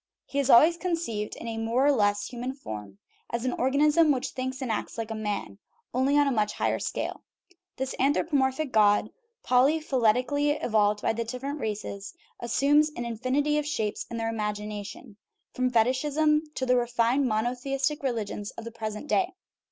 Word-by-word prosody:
He 280 Hz, -, -3 dB
is 280 Hz, -1 st, 0 dB
al 235 Hz, -, +9 dB
ways 335 Hz, +2 st, +3 dB
conceived 330 Hz, -, -2 dB
in -, -, -8 dB
a 225 Hz, -1 st, -3 dB
more 230 Hz, +4 st, +1 dB
or 290 Hz, -, +6 dB
less 205 Hz, -5 st, +2 dB
human 250 Hz, +2 st, -5 dB
form, 105 Hz, -, -8 dB, 0.3 s
as 235 Hz, +1 st, -3 dB
an 255 Hz, -, 0 dB
organism 300 Hz, +4 st, +3 dB
which 260 Hz, -2 st, -1 dB
thinks 260 Hz, 0 st, -4 dB
and 260 Hz, -4 st, -2 dB
acts 220 Hz, -, -3 dB
like 225 Hz, -1 st, -4 dB
a -, -, -1 dB
man 210 Hz, -2 st, -4 dB, 0.3 s
only 265 Hz, +3 st, +2 dB
on 290 Hz, -, +5 dB
a 275 Hz, -, +1 dB
much 210 Hz, -3 st, 0 dB
higher -, -, 0 dB
scale. -, -, -3 dB, 0.6 s
This 265 Hz, 0 st, -3 dB
anthropomorphic 280 Hz, 0 st, +1 dB
God, 210 Hz, -1 st, +4 dB, 0.3 s
polyphyletically 265 Hz, +1 st, +2 dB
evolved 210 Hz, -2 st, +2 dB
by -, -, +2 dB
the 230 Hz, +1 st, -2 dB
different 260 Hz, +5 st, -5 dB
races, 205 Hz, -3 st, -5 dB, 0.2 s
as 235 Hz, -1 st, -5 dB
sumes 295 Hz, +4 st, +4 dB
an 240 Hz, -, -4 dB
infinity 260 Hz, +6 st, 0 dB
of 295 Hz, -, -3 dB
shapes 220 Hz, -8 st, -2 dB
in 235 Hz, -, -5 dB
their 225 Hz, 0 st, -1 dB
imagination, 210 Hz, -2 st, -5 dB, 0.4 s
from 255 Hz, 0 st, +1 dB
fetichism 300 Hz, +6 st, +2 dB
to 260 Hz, -, -1 dB
the 250 Hz, 0 st, +3 dB
refined 240 Hz, +2 st, +1 dB
monotheistic 255 Hz, +6 st, -1 dB
religions 220 Hz, -5 st, -3 dB
of 230 Hz, -, -6 dB
the 230 Hz, -, -7 dB
present 215 Hz, +1 st, -5 dB
day. 370 Hz, +2 st, +1 dB
250 Hz, 175 wpm, -27 LUFS, 220-280 Hz, 0.6 s, al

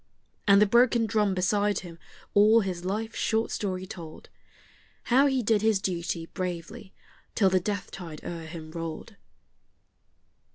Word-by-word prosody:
And 200 Hz, 0 st, +7 dB
the 210 Hz, -, +6 dB
broken 235 Hz, +2 st, +4 dB
drum 210 Hz, -3 st, +1 dB
beside 205 Hz, +3 st, +1 dB
him 170 Hz, -2 st, -11 dB, 0.3 s
all 215 Hz, +3 st, +6 dB
his 185 Hz, -3 st, -4 dB
life's 215 Hz, +4 st, -3 dB
short 225 Hz, +1 st, 0 dB
story 185 Hz, -3 st, -3 dB
told: 165 Hz, -4 st, -10 dB, 0.7 s
How 265 Hz, +4 st, +4 dB
he 265 Hz, -3 st, 0 dB
did 215 Hz, -1 st, +2 dB
his 220 Hz, -2 st, +3 dB
duty 170 Hz, -3 st, -3 dB
bravely 185 Hz, +4 st, -6 dB, 0.4 s
till 195 Hz, -4 st, +3 dB
the 185 Hz, -, +4 dB
death 200 Hz, +1 st, -4 dB
tide 165 Hz, -5 st, -9 dB
o'er 165 Hz, -1 st, -6 dB
him 160 Hz, -1 st, -9 dB
rolled. 165 Hz, +5 st, -6 dB
195 Hz, 140 wpm, -27 LUFS, 175-220 Hz, 0.7 s, And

